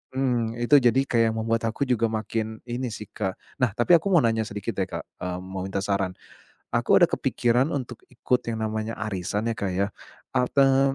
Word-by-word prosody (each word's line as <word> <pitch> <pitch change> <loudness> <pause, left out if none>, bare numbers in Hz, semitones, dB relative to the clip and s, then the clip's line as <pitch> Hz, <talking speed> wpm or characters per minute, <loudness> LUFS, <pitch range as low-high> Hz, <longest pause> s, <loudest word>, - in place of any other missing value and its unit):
mmm, 120 -3 0
itu 135 +5 +5
jadi 125 +1 +4
kayak 115 -3 +2
membuat 115 +1 0
aku 110 - -9
juga 120 -3 +1
makin 110 0 -3
ini 125 +1 -3
sih 105 - -7
Kak 95 -3 -2 0.3
Nah 125 -5 +3
tapi 120 +9 +4
aku 200 +5 -3
mau 175 -6 +5
nanya 115 -1 +2
sedikit 100 0 -4
deh - - +2
Kak, - - -4 0.2
eee, 90 0 -3
mau 95 0 -6
minta 95 0 -2
saran. 100 -2 0 0.6
Aku - - +4
ada - - +7
kepikiran 120 +3 +1
untuk 125 -4 -4
ikut 125 0 0
yang 110 -1 -3
namanya 110 +1 -3
arisan 105 +1 -2
ya - - -1
Kak 95 -2 -2
ya. 100 +2 +1 0.5
Apa 135 +1 +3
115 Hz, 190 wpm, -25 LUFS, 105-125 Hz, 0.6 s, ada